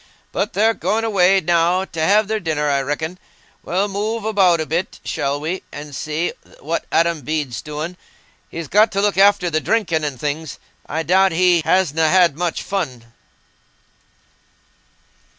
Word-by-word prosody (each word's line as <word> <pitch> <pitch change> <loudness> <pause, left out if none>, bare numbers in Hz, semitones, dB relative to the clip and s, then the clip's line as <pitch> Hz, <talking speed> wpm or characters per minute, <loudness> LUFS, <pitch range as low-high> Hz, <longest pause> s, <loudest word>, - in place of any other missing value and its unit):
"But 205 - -2
they're 220 +4 +3
going 225 0 -1
away 195 -3 +3
now, 175 +2 +2
t' 165 - -8
have 200 +6 +3
their 220 0 -1
dinner, 155 -5 -1
I 140 -1 +1
reckon. 160 +6 -4 0.4
We'll 190 +4 -1
move 210 +2 -3
about 190 -6 +3
a 155 - -1
bit, 170 +4 -3
shall 145 -2 -2
we, 165 +5 -3
and 145 -1 -8
see 155 +4 -2 0.3
what 165 +3 -3
Adam 165 -1 +2
Bede's 140 -4 -3
doing. 155 +4 -6 0.5
He's 165 -2 -6
got 215 +5 +4
to 195 - +1
look 205 -1 +1
after 200 -3 +4
the 155 0 0
drinking 170 -8 0
and 140 -4 -3
things: 150 +1 -4 0.3
I 160 +2 -2
doubt 190 +2 +3
he 175 0 +3
hasna 160 -3 +2
had 175 -4 +4
much 175 0 -2
fun." 125 -12 -4
170 Hz, 155 wpm, -20 LUFS, 155-195 Hz, 0.5 s, got